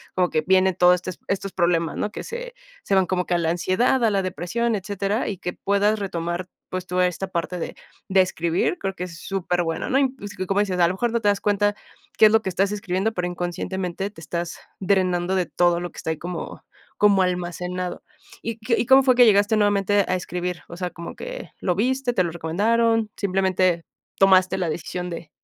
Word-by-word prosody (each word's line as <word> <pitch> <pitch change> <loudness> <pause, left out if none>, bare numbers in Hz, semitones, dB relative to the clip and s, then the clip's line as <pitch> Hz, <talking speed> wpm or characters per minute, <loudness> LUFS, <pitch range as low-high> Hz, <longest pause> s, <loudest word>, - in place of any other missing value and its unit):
como 180 -1 +2
que 155 - +1
viene 190 0 +4
todo 180 0 +5
este 180 +1 -5 0.2
estos 195 0 -2
problemas, 170 -2 +1
¿no?, 210 - -2
que - - -6
se - - -6 0.3
se 200 - -2
van 190 -1 +4
como 180 -1 0
que 180 - -1
a - - +3
la 165 -1 0
ansiedad, 190 +9 +1
a 220 - +4
la 195 -1 +1
depresión, 195 +6 -1
etcétera. 200 +2 -2
Y 200 - -4
que 180 - -4
puedas 205 +2 +1
retomar, 175 -2 -3 0.2
pues, 185 -1 -4
toda 180 0 +2
esta 185 +2 -4
parte 175 0 -3
de - - -5 0.3
de 190 0 +5
escribir, 170 -1 0
creo 195 -1 -2
que 180 - -4
es 165 -2 -10
superbueno, 175 -3 -2
¿no?, 265 - +3
y 265 -1 +1
es 205 0 -7
que, 185 - -2
como 195 +2 +1
dices, 185 -3 -1
a 170 - +5
lo 180 - -1
mejor 235 +4 0
no 235 - +1
te 205 - +3
das 200 -1 +1
cuenta 205 0 +2 0.4
qué 215 - +8
es - - +2
lo 220 - +5
que 190 - -3
estás 195 +3 +1
escribiendo, 200 +1 -1
pero 180 -3 -2
inconscientemente 180 +2 -3
te 165 - -14
estás 170 +1 -4 0.2
drenando 185 -2 +1
de 185 -1 +1
todo 175 -1 +2
lo 175 - -4
que - - -18
está - - -4
ahí 160 - -3
como 175 0 -6 0.3
como 200 -2 +5
almacenado, 180 0 -3 0.4
¿y 230 -1 -3
qué 230 +1 +1
y - - +1
cómo 270 0 +7
fue 255 -2 +4
que 245 - +7
llegaste 210 0 +4
nuevamente 205 -1 +2
a 185 - +1
escribir? 180 -1 -4
O 170 - -8
sea 180 -1 -3
como 170 - -8
que, - - -7
¿lo 180 - +1
viste? 255 +4 0
¿Te 185 - +2
lo 170 - -2
recomendaron? 220 +7 +1
Simplemente 185 -3 +1 0.4
tomaste 190 -1 +5
la 180 -3 -1
decisión 180 +3 -4
de 165 -1 -7
185 Hz, 220 wpm, -23 LUFS, 175-205 Hz, 0.4 s, qué